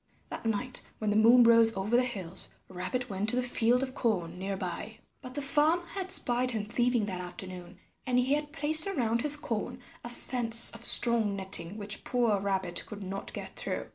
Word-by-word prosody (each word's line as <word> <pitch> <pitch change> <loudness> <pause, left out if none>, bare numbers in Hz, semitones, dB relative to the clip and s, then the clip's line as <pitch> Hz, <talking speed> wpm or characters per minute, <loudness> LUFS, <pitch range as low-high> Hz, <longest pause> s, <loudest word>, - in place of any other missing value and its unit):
That - - -7
night 245 +4 -1 0.2
when 215 -1 -3
the - - -2
moon 235 +3 +5
rose 230 -2 +4
over 205 +5 -2
the 245 - +3
hills 190 -7 -5 0.2
Rabbit 190 +8 -6
went 200 0 -4
to 245 - -3
the 250 - -1
field 245 +1 0
of 260 -1 -7
corn 180 -9 -3
near 195 +1 -5
by. 190 +4 -8 0.2
But 255 0 -12
the 290 - -4
farmer 310 +5 0
had 375 +1 -7
spied 245 -4 +4
him 220 -4 -5
thieving 240 +1 -1
that 185 -3 -7
afternoon, 180 0 -10 0.3
and 250 -1 -1
he 250 +2 0
had 295 0 -4
placed 310 +3 +4
around 235 - -2
his 295 +2 +1
corn 245 -3 -6 0.2
a 240 - -8
fence 240 -1 +5
of - - -11
strong 230 -4 +7
netting 190 0 -3
which 205 -1 -5
poor 230 -5 -1
Rabbit 190 -3 -3
could 205 -2 -10
not 195 +1 -7
get - - -8
through. - - -6
230 Hz, 200 wpm, -27 LUFS, 195-250 Hz, 0.3 s, strong